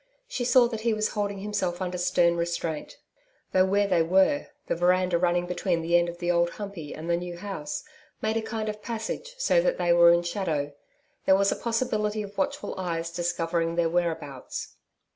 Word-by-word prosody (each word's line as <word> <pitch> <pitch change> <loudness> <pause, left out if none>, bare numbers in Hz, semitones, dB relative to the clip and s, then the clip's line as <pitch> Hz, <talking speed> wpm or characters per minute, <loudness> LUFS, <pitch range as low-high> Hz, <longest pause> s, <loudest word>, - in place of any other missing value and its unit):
She 380 - -3
saw 250 0 +6
that 225 -2 -4
he 230 -1 +1
was 215 0 0
holding 205 -1 -2
himself 195 -4 -2
under 180 -1 -3
stern 170 -1 +3
restraint. 170 -2 -3 0.5
Though 185 0 +4
where 200 +2 +2
they 180 -4 +3
were, 190 - +3 0.2
the - - 0
veranda 180 0 +2
running 175 0 +2
between 175 -1 -1
the 170 +1 +2
end 175 0 +4
of 170 - -8
the 175 0 0
Old 170 0 +3
Humpey 195 -8 -7
and 160 +2 -7
the 170 - +2
new 175 0 -6
house, 175 -6 -5 0.4
made 220 0 -1
a 225 - +1
kind 220 0 -4
of 210 0 -4
passage 235 - -5
so - - +3
that - - +1
they 175 0 +3
were 170 0 +7
in 170 0 +3
shadow, 165 -6 -2 0.5
there 190 - +6
was 200 0 +3
a - - 0
possibility 220 -3 -1
of 200 0 -10
watchful 190 - -2
eyes 170 -2 -2
discovering 170 -1 -1
their 170 -1 +2
whereabouts. 160 -6 -3
180 Hz, 195 wpm, -27 LUFS, 170-210 Hz, 0.5 s, were